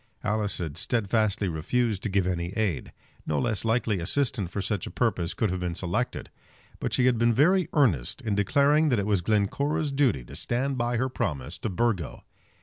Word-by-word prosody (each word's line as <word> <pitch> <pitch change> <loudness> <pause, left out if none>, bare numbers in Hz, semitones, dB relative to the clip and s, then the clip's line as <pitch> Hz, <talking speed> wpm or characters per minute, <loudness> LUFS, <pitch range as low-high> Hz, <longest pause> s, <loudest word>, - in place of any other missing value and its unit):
Alice 105 -2 0
had 80 -2 -4
steadfastly 110 -3 +1
refused 100 +6 0
to 105 - -2
give 95 -1 +1
any 85 -2 -1
aid. 105 -10 -1 0.4
No 75 - 0
less 110 +1 0
likely 115 -3 +1
assistant 105 +1 0
for 95 - -4
such 100 -1 -2
a - - -4
purpose 95 -7 -1
could 105 -3 0
have 95 - -2
been 90 -1 -3
selected. 100 +8 -2 0.5
But - - -2
she 125 - +2
had 125 -3 +3
been 120 0 +4
very 175 - +3
earnest 95 - +2
in 110 - -1
declaring 140 +10 +3
that 125 - +2
it 100 - 0
was 100 -3 +1
Glencora's 140 - 0
duty 135 - +2
to - - -11
stand 135 +3 -1
by 120 -1 0
her 130 +3 +1
promise 70 - -3
to - - -2
Burgo. 100 - -1
110 Hz, 190 wpm, -27 LUFS, 90-125 Hz, 0.5 s, been